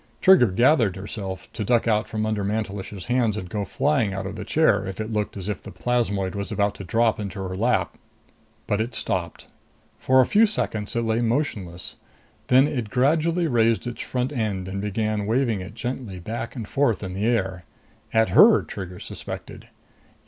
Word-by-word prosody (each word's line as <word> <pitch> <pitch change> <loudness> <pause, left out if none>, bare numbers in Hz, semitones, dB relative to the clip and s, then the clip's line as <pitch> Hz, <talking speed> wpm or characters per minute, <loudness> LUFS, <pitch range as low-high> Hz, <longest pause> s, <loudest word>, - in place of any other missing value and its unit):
Trigger 190 -10 +6
gathered 115 - +3
herself 95 -1 -6
to 110 - -3
duck 120 +2 +2
out 110 -1 +2
from 110 -1 -2
under 110 -2 -1
Mantelish's 100 -2 -3
hands 120 -4 +1
and 95 - -5
go 100 +3 -3
flying 135 -4 0
out 95 0 -4
of 95 - -5
the - - -5
chair 145 -11 +3
if 95 - -6
it 110 +1 -3
looked 105 -1 -2
as 95 -1 -6
if 105 -3 -3
the - - -10
plasmoid 100 -6 -1
was 100 -2 -4
about 100 -1 +1
to - - -9
drop 115 +4 +1
into 100 -1 -5
her 95 -1 -4
lap. 115 +6 0 0.7
But 105 +1 0
it 115 +1 -3
stopped. 90 -6 -3 0.5
For 130 0 +4
a 130 - +6
few 220 +2 +4
seconds 110 - -2
it 115 - +1
lay 115 0 +1
motionless. 115 - -2 0.5
Then 130 +3 +5
it 120 -7 -3
gradually 160 +8 +2
raised 115 -5 +2
its 120 -1 -5
front 125 +1 -2
end 105 -8 -2
and 100 +1 -4
began 105 0 -1
waving 115 -3 +1
it 95 +4 -9
gently 120 -6 -5
back 115 +7 -5
and 115 -5 -5
forth 120 -7 +1
in 95 -1 -5
the 100 +4 -1
air. 95 -7 -1 0.5
At 110 0 +3
her, - - +7
Trigger 90 -2 -7
suspected. - - -8
110 Hz, 185 wpm, -24 LUFS, 100-120 Hz, 0.7 s, her